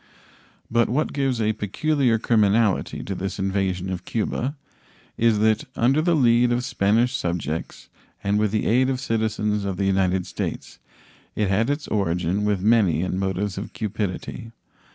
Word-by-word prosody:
But 120 0 +3
what 140 +6 0
gives 135 -4 0
a 110 0 +1
peculiar 120 +4 +1
criminality 110 -2 +2
to 100 - -4
this 95 +1 -4
invasion 95 -1 -1
of 90 -1 -4
Cuba 125 +5 -2 0.6
is 115 -2 +3
that, 110 +1 +2
under 135 +6 +3
the 170 +1 +2
lead 120 -3 +4
of 120 +1 0
Spanish 120 +1 +1
subjects 85 -5 -3 0.4
and 100 +1 +1
with 105 0 +2
the 110 +1 -1
aid 130 +3 +3
of 130 -1 -1
citizens 110 -4 -1
of 95 -2 -3
the 100 - 0
United 95 -1 +1
States, - - -5 0.6
it 105 -3 0
had 110 +6 +1
its 145 +1 -2
origin 95 0 0
with 105 -3 0
many 100 -8 +3
in 95 +1 -2
motives 95 0 -2
of 100 - -8
cupidity. 105 +1 -4
105 Hz, 155 wpm, -23 LUFS, 95-120 Hz, 0.6 s, lead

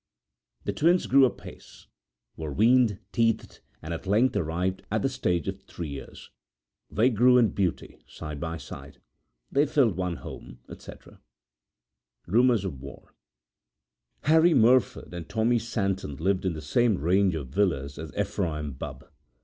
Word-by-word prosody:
The - - -2
twin's 175 +4 +3
grew 135 0 +6
apace; 125 - -8 0.5
were 80 -2 -5
weaned; 115 - +3 0.2
teethed; 115 -1 0 0.2
and 80 +2 -4
at 85 - -7
length 115 +5 +3
arrived 90 +1 -1
at 110 +1 -1
the 135 - +2
stage 90 - -1
of - - -4
three 85 -3 -7
years! 70 -1 -10 0.6
They 120 +5 +2
grew 125 +3 +5
in 115 -3 +4
beauty 95 -4 -3
side 75 -1 -8
by 80 0 -4
side, 70 0 -11 0.5
They 145 +2 +3
filled 135 - +2
one 90 -2 -2
home, - - -10
etc. - - -13 1.0
Rumours 115 0 +3
of 70 -9 -5
War[edit] 70 0 -12 1.1
Harry 160 +3 +5
Merford 120 -4 +3
and 85 0 -7
Tommy 115 +3 +2
Santon 100 - -2
lived 95 +5 0
in 90 - 0
the 80 -1 -7
same 110 +7 +2
range 90 +4 +2
of 70 -5 -5
villas 75 -5 -1
as 80 0 -7
Ephraim 90 -8 -2
Bubb. 65 - -8
95 Hz, 145 wpm, -27 LUFS, 80-120 Hz, 1.1 s, grew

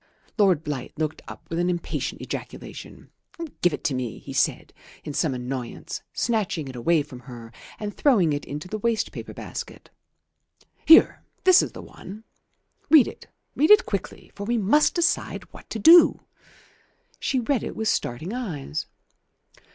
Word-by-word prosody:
Lord 185 -7 +4
Blight 145 -3 -5
looked 155 0 -3
up - - -11
with 165 - -3
an 175 +1 +1
impatient 175 -1 -3
ejaculation - - -8 0.5
"Give 175 - +4
it 145 - -6
to 140 - 0
me," 125 -3 -3
he - - -9
said - - 0 0.3
in 150 - -6
some 140 -3 0
annoyance, 125 0 -5
snatching 205 - -1
it 130 - -8
away 150 +6 +2
from 135 -4 -11
her 120 -2 -11 0.3
and 205 -1 -5
throwing 200 - +3
it 145 - -3
into 150 +5 -7
the 215 +3 -4
waste 225 0 0
paper - - -8
basket. - - -8 1.0
"Here, 325 - +7 0.2
this 370 -1 +7
is - - -4
the - - -9
one. 210 +4 -11 0.7
Read 310 -6 +7
it; - - -10 0.3
read 305 - +3
it 425 +2 +7
quickly; - - -5
for 200 - -7
we 235 +3 0
must 230 +9 +3
decide 345 0 0
what - - -14
to - - -4
do." 330 +11 +7 1.0
She 260 - 0
read 250 +1 0
it - - -6
with 220 - -2
starting 155 - -2
eyes. 160 - -4
180 Hz, 160 wpm, -24 LUFS, 145-230 Hz, 1.0 s, Here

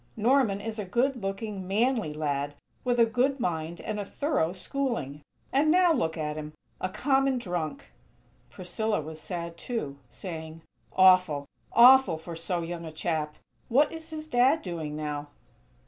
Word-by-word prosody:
Norman 230 -3 +3
is 220 +1 -5
a - - -1
good 245 +6 0
looking, 195 -1 -4
manly 225 - +1
lad, 145 -1 -2 0.3
with 245 -1 +1
a 230 - +7
good 255 +5 +1
mind 165 -4 -2
and 215 -1 -3
a - - -2
thorough 260 - 0
schooling. 190 - -3 0.3
And 285 +3 +4
now 355 0 +5
look 165 - -1
at 150 -1 -3
him! 155 0 -6 0.3
A 185 - -2
common 270 +5 +2
drunk!!" 170 - -4 0.6
Priscilla 210 +4 -2
was 155 +1 -7
sad, 170 -1 -5
too, 150 - -4
saying: 160 +2 -7 0.3
"Awful! 185 -6 +5 0.3
Awful 255 -6 +7
for 165 +1 -8
so 170 +1 -2
young 170 0 -5
a 160 - -7
chap. 155 -1 -2 0.3
What 280 +5 +4
is 320 0 -6
his 310 -1 -5
Dad 275 +2 +3
doing 160 -5 -4
now?" 150 -1 -4
185 Hz, 155 wpm, -28 LUFS, 160-245 Hz, 0.6 s, a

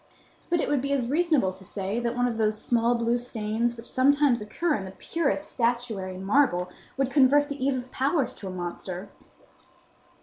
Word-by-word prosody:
But 345 -1 +2
it - - 0
would 285 -3 +1
be 280 +1 -2
as 255 -4 0
reasonable 295 - +2
to 190 - -15
say 195 +3 -3
that 240 0 -2
one 245 0 +2
of 230 -2 -3
those 215 0 +1
small 235 +1 +2
blue 235 +1 +1
stains 235 0 -2
which 230 - -10
sometimes 275 -2 +3
occur 305 +10 -1
in 205 - -2
the 190 - -7
purest 310 -2 -1
statuary 230 -6 -1
marble 190 -3 +2 0.3
would 270 -1 0
convert 290 +2 +5
the 285 -2 -4
Eve 275 0 +2
of 250 0 -6
Powers 270 -1 +1
to 200 - -8
a - - -4
monster. 180 +1 -5
240 Hz, 190 wpm, -26 LUFS, 210-280 Hz, 0.3 s, convert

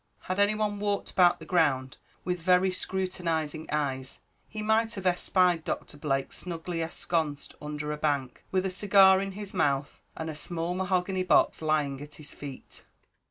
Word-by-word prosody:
Had 185 +2 -3
any 205 +1 +4
one 210 -1 -1
walked 205 -1 -1
about 180 -2 +5
the - - -11
ground 135 -7 +1 0.3
with 180 0 -1
very 180 +2 +3
scrutinising 170 -5 -2
eyes, 135 -3 -2 0.3
he 215 -1 -5
might 220 +1 +2
have 195 -2 -6
espied 180 -1 +3
Doctor - - -4
Blake 135 -2 -1
snugly 170 -1 -4
ensconced 160 -2 -2
under 150 0 -4
a 150 - -3
bank 140 -4 -1
with 185 0 0
a 190 - -1
cigar 190 0 +6
in 195 0 -4
his 205 0 -7
mouth, 145 -5 0 0.2
and 160 - -4
a 160 - -3
small 165 +3 -3
mahogany 185 0 0
box 180 -2 +3
lying 150 -3 0
at 150 0 -9
his 155 - -9
feet. 140 -2 -9
175 Hz, 165 wpm, -28 LUFS, 150-190 Hz, 0.3 s, cigar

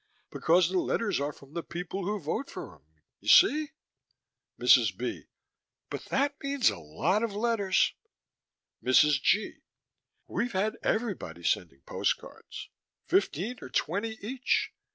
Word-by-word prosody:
Because 170 +1 +3
the 185 - +2
letters 205 -1 0
are 145 +1 -1
from 140 0 -17
the 170 - -3
people 180 +3 -5
who 210 +2 -1
vote 175 - -3
for - - -8
him, - - -21 0.4
you - - -15
see? 310 -5 +6 0.9
MRS. - - +5
B.: - - -4 0.6
But - - -5
that 285 +1 -1
means 275 -3 +2
a 100 - -8
lot 135 - 0
of 225 -3 -2
letters. 210 -4 +2 0.9
MRS. 140 +2 +4
G.: 215 - +1 0.7
We've 240 -1 -2
had 210 +4 0
everybody 195 - -2
sending 80 -5 -1
postcards. - - -4 0.4
Fifteen 220 - 0
or - - -8
twenty 205 - -1
each. 260 +3 0
200 Hz, 135 wpm, -29 LUFS, 150-230 Hz, 0.9 s, see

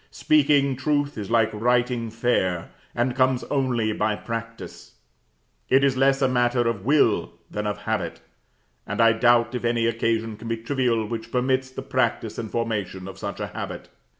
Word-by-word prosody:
Speaking 145 - +3
truth 145 +2 0
is 105 -3 -6
like 115 -1 +2
writing 120 +1 +1
fair, 100 -7 0 0.2
and 120 +1 0
comes 130 -1 +2
only 125 -6 +1
by 105 0 0
practice; 115 +1 -7 0.8
it 135 +1 +4
is 135 -2 +3
less 135 +1 +3
a - - +5
matter 120 -1 +2
of 110 -5 -2
will 145 +5 +2 0.2
than 105 0 -3
of 105 - -2
habit, - - -3 0.7
and - - -4
I 115 0 +6
doubt 120 +1 +3
if 125 - -3
any 115 -1 +1
occasion 115 -1 0
can 115 +2 -9
be 115 0 -1
trivial 115 -2 0
which 115 +1 -6
permits 130 +1 0
the 130 - -7
practice - - -1
and 110 - -4
formation 100 -5 -3
of 95 - -9
such - - -5
a - - -2
habit. - - -7
120 Hz, 170 wpm, -24 LUFS, 115-130 Hz, 0.8 s, I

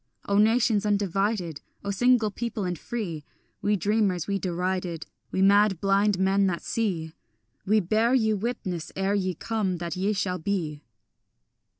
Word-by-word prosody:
O 200 0 +3
nations 220 -1 +3
undivided, 195 -5 0 0.2
O 200 - -1
single 235 +1 +3
people 230 0 -4
and 175 -3 -3
free, 180 -11 -4 0.4
We 210 +1 +2
dreamers, 200 -3 +1
we 200 -1 -1
derided, 180 -2 -2 0.2
We 190 - 0
mad 200 -2 +4
blind 200 +1 +2
men 195 +1 +3
that 170 -3 -2
see, 175 -8 -2 0.5
We 215 +2 +4
bear 220 +7 +2
you 220 -4 +2
witness 190 -7 -4
ere 195 +1 0
ye 185 -3 0
come 205 -2 -2
that 170 0 -4
ye 195 +3 0
shall 185 -2 -1
be. 160 -5 -2
195 Hz, 150 wpm, -26 LUFS, 180-215 Hz, 0.5 s, mad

